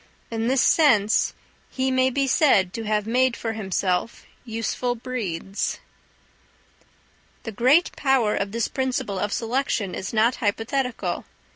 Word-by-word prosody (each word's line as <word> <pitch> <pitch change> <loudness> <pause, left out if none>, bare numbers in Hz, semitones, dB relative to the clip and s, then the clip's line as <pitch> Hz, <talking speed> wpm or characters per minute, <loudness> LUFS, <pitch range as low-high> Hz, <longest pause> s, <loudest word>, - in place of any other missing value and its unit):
In 225 0 -1
this 260 0 +3
sense 220 -10 +3 0.3
he 265 0 -1
may 260 0 +3
be 275 +2 0
said 245 - +3
to 225 -1 -5
have 210 -1 0
made 250 +2 +2
for 225 -1 -3
himself 190 -1 -2 0.2
useful 235 +1 -2
breeds. 205 -6 -3 1.7
The 225 - -5
great 255 - +3
power 265 -7 +2
of 200 0 -2
this 230 +1 -1
principle 255 -7 -2
of 205 +2 -2
selection 230 -4 -1
is 190 - -5
not 230 +3 +2
hypothetical. 230 +4 -2
230 Hz, 130 wpm, -24 LUFS, 210-260 Hz, 1.7 s, this